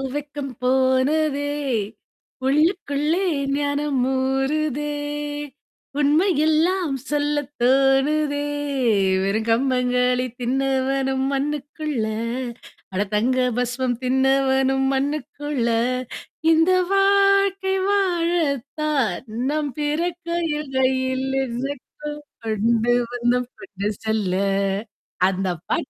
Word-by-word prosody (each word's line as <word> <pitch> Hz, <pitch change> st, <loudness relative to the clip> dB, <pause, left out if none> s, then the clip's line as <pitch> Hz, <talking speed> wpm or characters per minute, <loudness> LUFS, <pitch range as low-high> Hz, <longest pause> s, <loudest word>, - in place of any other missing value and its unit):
வெக்கம் 290 Hz, -2 st, -5 dB
போனதே! 270 Hz, +3 st, +2 dB, 0.9 s
உள்ளுக்குள்ளே 305 Hz, +2 st, +1 dB, 0.3 s
ஞானம் 285 Hz, -2 st, 0 dB
ஊறுதே! 275 Hz, +3 st, 0 dB, 1.1 s
உண்மையெல்லாம் 315 Hz, +1 st, +2 dB, 0.2 s
சொல்லத் 290 Hz, -1 st, -1 dB
தோணுதே! 275 Hz, +3 st, +3 dB, 0.8 s
வெற 195 Hz, +1 st, 0 dB
கம்பங்களி 250 Hz, 0 st, +2 dB, 0.2 s
தின்னவனும் 265 Hz, +1 st, 0 dB
மன்னுக்குள்ள! 290 Hz, -2 st, -2 dB, 0.9 s
அட 185 Hz, -, 0 dB
தங்க 245 Hz, +5 st, +2 dB, 0.2 s
பஸ்வம் 250 Hz, 0 st, -1 dB
தின்னவனும் 265 Hz, 0 st, +2 dB
மன்னுக்குள! 290 Hz, -1 st, -2 dB, 0.9 s
இந்த 325 Hz, +3 st, +4 dB, 0.2 s
வாழ்கை 395 Hz, -1 st, +3 dB
வாழத்தான் 305 Hz, -, 0 dB, 0.3 s
நம் 300 Hz, -2 st, -1 dB
பிறக்கையில் 330 Hz, -1 st, -2 dB
கையில் 260 Hz, 0 st, +1 dB, 0.2 s
என்ன 245 Hz, +1 st, -4 dB, 0.8 s
கொண்டு 225 Hz, +2 st, +2 dB, 0.2 s
வந்தோம் 245 Hz, 0 st, 0 dB
கொண்டு 200 Hz, 0 st, -5 dB, 0.2 s
செல்ல. 215 Hz, -4 st, 0 dB, 0.9 s
அந்த 190 Hz, 0 st, -1 dB, 0.2 s
பாட் -, -, -1 dB
275 Hz, 70 wpm, -22 LUFS, 255-305 Hz, 1.1 s, இந்த